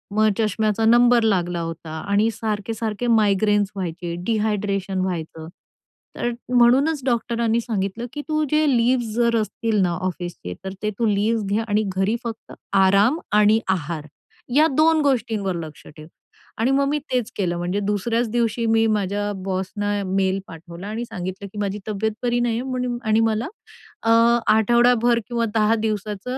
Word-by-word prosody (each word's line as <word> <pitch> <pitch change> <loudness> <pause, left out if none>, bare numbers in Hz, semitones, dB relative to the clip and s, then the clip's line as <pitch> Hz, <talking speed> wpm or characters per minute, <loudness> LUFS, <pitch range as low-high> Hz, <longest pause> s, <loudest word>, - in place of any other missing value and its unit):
मग 215 0 +4
चष्म्याचा 215 0 0
नंबर 240 +1 +5
लागला 175 -5 +1
होता 165 -1 -6
आणि 200 +5 +1
सारखे-सारखे 220 +1 -3
मायग्रेन्स 210 -2 +2
व्हायचे, 175 -2 -4
डिहायड्रेशन 205 -3 -1
व्हायचं. 165 -3 -4 0.7
तर 240 - -1 0.2
म्हणूनच 255 +5 +4
डॉक्टरांनी 235 -2 0
सांगितलं, 220 -1 -3
की 295 - -4
"तू 310 -1 0
जे 305 0 +3
लीव्हज 235 -1 +1
जर 235 0 +2
असतील 215 +1 -1
ना 180 -2 +2
ऑफिसचे, 175 - -5
तर 190 - -5
ते 210 - +1
तू 235 - +2
लीव्हज 215 +2 +1
घ्या 205 +3 0
आणि 210 0 +1
घरी 190 +4 +1
फक्त 225 -1 -7 0.3
आराम 200 - +4 0.2
आणि 210 +1 +5
आहार 165 -4 -2 0.5
या 310 +2 +6
2 315 0 +4
गोष्टींवर 225 -9 0
लक्ष 155 -2 -11
ठेव." 155 0 -12 0.5
आणि 230 +4 +1
मग 275 +1 +2
मी 295 - +1
तेच 250 -3 -1
केलं, 175 -3 -1
म्हणजे 175 +3 -2
दुसऱ्याच 225 +3 0
दिवशी 235 -1 0
मी 225 0 +3
माझ्या 205 -1 -1
बॉसना 195 +2 -2
मेल 190 0 0
पाठवला 170 +3 -10
आणि 225 +3 -4
सांगितलं, 185 -1 -6
की 200 - -13
माझी 205 0 -2
तब्येत 215 +1 -1
बरी 240 0 +1
नाहीये 240 -1 0
म्हणून 250 -2 -2
आणि 220 0 +3
मला 225 +1 +1 0.6
अ, 225 - 0 0.5
आठवडाभर 240 +1 +3
किंवा 235 -1 -1
10 220 0 +3
दिवसांच 210 -2 -3
215 Hz, 150 wpm, -22 LUFS, 195-235 Hz, 0.7 s, या